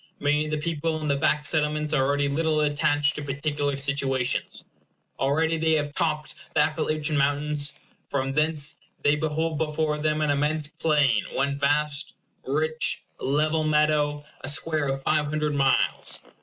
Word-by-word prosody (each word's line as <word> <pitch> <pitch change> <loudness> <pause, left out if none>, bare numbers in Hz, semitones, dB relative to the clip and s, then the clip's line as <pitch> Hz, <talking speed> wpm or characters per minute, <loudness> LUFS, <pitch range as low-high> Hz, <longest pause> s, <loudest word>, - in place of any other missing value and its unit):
Many 150 +1 +2
of - - -5
the 155 - -1
people 160 0 -2
in 155 - -4
the 140 - +2
back 150 +1 +1
settlements 150 0 0
are 135 -3 +3
already 145 +1 +1
little 155 +2 +1
attached 145 0 +2
to - - -5
particular 145 0 -2
situations. 135 -2 -1 0.5
Already 160 +4 +1
they 160 0 +2
have 145 -2 0
topped 155 -1 -1 0.2
the 155 - +5
Appalachian 155 0 0
Mountains. 145 +1 0 0.4
From 135 -1 -1
thence 150 +1 -1 0.3
they 145 +1 +4
behold 155 0 -1
before 150 -1 0
them 155 0 0
an 150 -1 +2
immense 150 +2 0
plain, 145 -7 +2
one 140 +1 0
vast, 145 +1 0 0.3
rich, 155 +3 0 0.2
level 155 +3 +1
meadow; 150 -1 +2 0.2
a - - -4
square 150 +1 +1
of 135 0 -2
five 150 0 +2
hundred 150 0 -1
miles. 135 -2 +1
150 Hz, 155 wpm, -26 LUFS, 145-155 Hz, 0.5 s, the